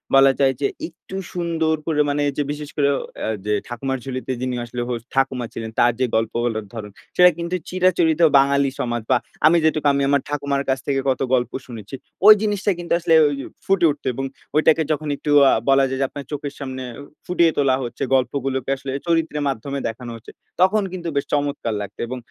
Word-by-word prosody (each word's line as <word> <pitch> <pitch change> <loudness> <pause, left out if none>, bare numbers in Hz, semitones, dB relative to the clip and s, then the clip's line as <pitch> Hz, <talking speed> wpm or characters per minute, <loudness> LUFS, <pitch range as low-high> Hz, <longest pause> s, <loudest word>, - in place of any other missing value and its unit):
বলা 135 0 +7
যায় 135 -1 +4
যে 140 - +3 0.2
একটু 175 +3 -12 0.2
সুন্দর 165 -2 0
করে 155 -3 +1
মানে 145 +1 0 0.2
যে 145 - +1
বিশেষ 145 0 -6
করে 145 -2 +2
ও - - -3 0.3
আ - - -2 0.2
যে 105 - +1
ঠাকুমার 135 +2 -3
ঝুলিতে 130 0 -4
যিনি 130 -1 -2
আসলে 120 +1 -5
হোস্ট 120 -2 -4
ঠাকুমা 135 -2 +1
ছিলেন। 115 -1 -5
তার 120 - +5
যে 130 - +3
গল্পগুলোর 115 0 -1
ধরন 105 -3 -7 0.2
সেটা 180 0 +8
কিন্তু 170 +1 -3
চিরাচরিত 180 -3 +2 0.2
বাঙালি 140 0 +3
সমাজ 120 -1 -1
বা 130 - +6 0.3
আমি 165 +2 +6
যেটুকু 155 -2 +2
আমি 140 0 +1
আমার 140 -1 +3
ঠাকুমার 140 -1 -1
কাছ 130 0 +1
থেকে 140 -1 +1
কত 130 - 0
গল্প 125 -1 +1 0.2
শুনেছি। 115 0 -8 0.3
ওই 215 - +13
জিনিসটাই 205 -2 0
কিন্তু 170 -1 -2
আসলে 165 -1 +1
ঐ - - +5 0.4
ফুটে 195 -3 +3
উঠত। 145 - -9
এবং 135 +3 -3 0.3
ঐটাকে 160 +1 +4
যখন 155 0 -2
একটু 145 - -3 0.2
আ - - +5 0.2
বলা 135 0 +5
যায় 130 0 -3
যে, - - +3
আপনার 140 -1 -8
চোখের 145 -1 -4
সামনে 130 -2 -5 0.4
ফুটিয়ে 170 -2 +3
তোলা 135 -2 +3
হচ্ছে, 120 - -5
গল্পগুলোকে 130 0 -1
আসলে 135 0 -6 0.2
চরিত্রের 160 -3 0
মাধ্যমে 140 +2 -4
দেখানো 120 +1 -6
হচ্ছে, 115 +1 -12 0.3
তখন 205 +3 +4
কিন্তু 180 -2 -6
বেশ 140 - 0
চমৎকার 145 -5 -1
লাগত। 100 0 -8
এবং 130 +2 -5
140 Hz, 195 wpm, -21 LUFS, 130-160 Hz, 0.4 s, ওই